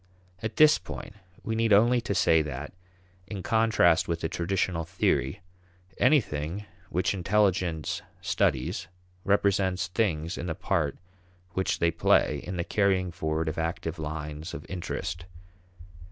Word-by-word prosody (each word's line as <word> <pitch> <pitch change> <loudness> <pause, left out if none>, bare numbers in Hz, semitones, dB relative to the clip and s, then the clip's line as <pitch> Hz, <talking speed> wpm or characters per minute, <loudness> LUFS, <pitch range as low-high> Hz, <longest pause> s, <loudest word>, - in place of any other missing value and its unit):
At 110 0 -4
this 155 0 +6
point, - - -8 0.3
we 115 - -2
need 115 0 +1
only 120 +4 +5
to 110 -4 -2
say 85 -3 +4
that, 75 -1 -5 0.5
in 100 -3 -6
contrast 110 -7 +3
with 85 -1 -2
the 80 - -1
traditional 85 -1 -1
theory, 80 - 0 0.6
anything 105 - +1 0.2
which 90 +3 0
intelligence 95 -4 +1 0.2
studies - - 0 0.4
represents 95 -2 +2
things 85 -5 -1
in 85 - -4
the 80 - -2
part - - -1 0.5
which 95 +3 0
they 85 0 +2
play 85 - +2
in 90 0 -5
the 85 - 0
carrying 95 -2 +1
forward 80 0 -2
of 80 +1 -2
active 80 0 -3
lines 75 +1 -5
of 75 - -8
interest. 85 -1 -4
90 Hz, 135 wpm, -28 LUFS, 80-100 Hz, 0.6 s, this